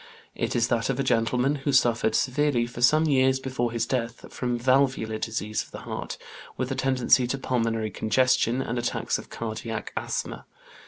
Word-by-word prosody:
It - - -2
is 115 -1 +2
that 115 +1 0
of 135 0 -1
a - - +2
gentleman 125 +3 +1
who 140 +1 -1
suffered 120 -4 +3
severely 135 -2 +1
for 120 0 -8
some 155 +6 +5
years 130 -3 +3
before 125 -3 -2
his 115 -1 -1
death 120 -2 -4
from 125 -1 -1
valvular 130 -3 +1
disease 110 -1 -2
of - - -11
the - - -9
heart, - - -5 0.4
with 130 +1 -2
a - - -1
tendency 130 -1 +3
to 135 - -2
pulmonary 115 -4 -1
congestion, 125 +2 +2
and 120 +1 -2
attacks 120 - -1
of - - -12
"cardiac 110 -1 -5
asthma." - - -4
125 Hz, 175 wpm, -26 LUFS, 115-130 Hz, 0.4 s, some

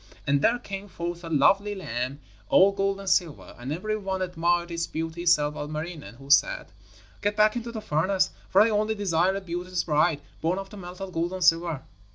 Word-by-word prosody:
And 140 0 +2
there 230 +10 +3
came 200 -4 -7
forth 175 -2 -5
a 165 - -6
lovely 195 +7 +3
lamb 130 - -4 0.3
all 195 +1 +6
gold 195 0 0
and 195 - -9
silver, 170 -5 0
and 125 +3 -5
every 215 +7 -2
one 190 -3 -2
admired 175 -1 0
its 170 0 -2
beauty 165 +2 -4
save 150 -3 +4
Ilmarinen, 155 -1 -6
who 135 +2 -8
said: - - +3 0.5
'Get 205 0 0
back 215 +1 +4
into 235 -1 -4
the 220 -2 -5
furnace, 185 +4 +1 0.2
for 195 - +5
I 225 +1 +4
only 215 +1 +1
desire 190 -2 +1
a 195 - -3
beauteous 180 0 -3
bride, 155 -1 +2 0.2
born 170 +3 +1
of 195 0 -6
the 210 - -10
melted 185 0 -8
gold 170 +2 -1
and 185 -1 -3
silver.' 165 -4 +3
175 Hz, 200 wpm, -26 LUFS, 160-195 Hz, 0.5 s, all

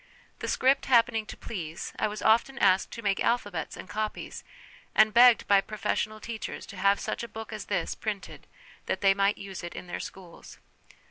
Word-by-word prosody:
The - - -4
script 270 +2 +2
happening 230 -3 +3
to - - -8
please, 170 -7 -6
I - - +2
was 210 0 -6
often 235 +5 +3
asked 190 -5 +3
to 230 - -7
make 200 -1 +1
alphabets 205 -9 -1
and - - -9
copies, 215 +1 -4 0.5
and 215 0 +5
begged 240 0 +7
by 200 -1 +5
profes 210 0 -1
sional 215 0 -12
teachers 225 0 -6
to - - -9
have 200 +2 +3
such - - -3
a 235 - -5
book 220 -1 -8
as 215 - -6
this 200 - -1
printed, 210 -3 -6 0.4
that - - -1
they 195 -1 +5
might 200 +1 +2
use 195 -2 -8
it 175 - -7
in - - -7
their 175 - -5
schools. 180 -3 -10
210 Hz, 195 wpm, -28 LUFS, 195-225 Hz, 0.5 s, begged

